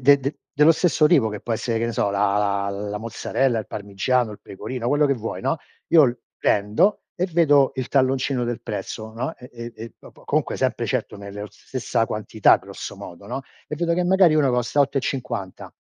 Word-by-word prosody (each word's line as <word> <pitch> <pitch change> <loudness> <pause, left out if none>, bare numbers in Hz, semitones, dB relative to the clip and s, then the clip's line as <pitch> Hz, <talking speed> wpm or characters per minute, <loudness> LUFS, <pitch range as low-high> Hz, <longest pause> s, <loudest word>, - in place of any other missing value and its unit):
de 140 +2 +7
de 140 +3 -2 0.2
dello 150 +1 +6
stesso 165 -1 +3
tipo 140 -10 +4
che 105 -1 -6
può 120 - -3
essere 115 +1 -1
che 115 - 0
ne 115 - -2
so 100 - +1
la 100 0 +1
la 100 -1 0
la 105 +1 -4
mozzarella, 115 +2 -1
il 110 - -5
parmigiano, 110 +4 -1
il 105 - -9
pecorino, 120 +5 -6
quello 145 +2 +3
che 140 - +2
vuoi, 115 -2 -5
no. 135 +5 0 0.3
Io 140 -8 +5 0.2
prendo 105 - +2 0.2
e 180 -1 0
vedo 150 -6 +4
il 130 -2 -3
talloncino 130 -1 +1
del 120 0 -3
prezzo, 110 0 -5
no, 130 +8 -4
e 125 - -13
e 120 0 -8
e 115 +1 -9
dopo - - -16
comunque - - 0
sempre - - 0
certo - - -2
nella 100 +1 -7
stessa 115 +1 -2
quantità 110 0 +3
grosso - - -8
modo, 90 +3 -10
no. 135 - -4 0.3
E 150 - -4
vedo 170 +2 0
che 180 +1 +1
magari 180 -3 +5
uno 140 -3 +3
costa 125 +3 -1
8,50, 130 -8 -2
120 Hz, 195 wpm, -23 LUFS, 105-145 Hz, 0.3 s, de